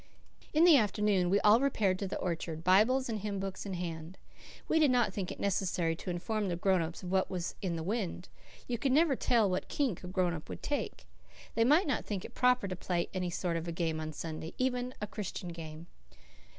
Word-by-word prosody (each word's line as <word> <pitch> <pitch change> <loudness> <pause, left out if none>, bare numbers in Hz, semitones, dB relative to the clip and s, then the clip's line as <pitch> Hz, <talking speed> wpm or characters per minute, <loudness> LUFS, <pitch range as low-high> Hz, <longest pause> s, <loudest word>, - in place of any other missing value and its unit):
In 310 +2 +4
the 340 -4 +8
afternoon 210 -5 +2
we 200 +2 +4
all 210 +2 +6
repaired 210 -9 +1
to 200 - -2
the - - -3
orchard, 165 -2 -3
Bibles 220 +9 +4
and 220 -3 -2
hymn 200 -1 -3
books 195 +1 -5
in 190 - -3
hand. 170 0 -5 0.5
We 320 - +3
did 300 -3 +5
not 240 -6 +2
think 190 -2 -3
it - - -8
necessary 180 -4 0
to - - -6
inform 205 +4 -2
the 175 - -1
grown 185 +1 +2
ups 165 +3 -5
of 180 - -5
what 190 0 +2
was 180 -1 -3
in 180 -3 -1
the 165 - -3
wind. 190 -2 -3 0.4
You 240 -2 -2
could 270 0 +1
never 305 -1 +4
tell 235 -4 +3
what 185 -1 -1
kink 255 - -1
a - - -6
grown 180 -2 0
up 155 -2 -7
would - - -7
take. 290 -1 -3 0.5
They 230 - +3
might 300 +9 +5
not 280 -6 0
think 200 -3 -4
it - - -10
proper 250 -4 +3
to 185 - -3
play 175 -1 -2
any 180 -1 -1
sort 170 -1 -1
of 165 +1 -5
a - - -2
game 165 -2 -1
on 155 0 -4
Sunday, 160 0 -5
not 255 - +3
even 250 0 -2
a 210 - -2
Christian 195 -3 -5
game. 165 -1 -8
190 Hz, 230 wpm, -32 LUFS, 175-230 Hz, 0.5 s, the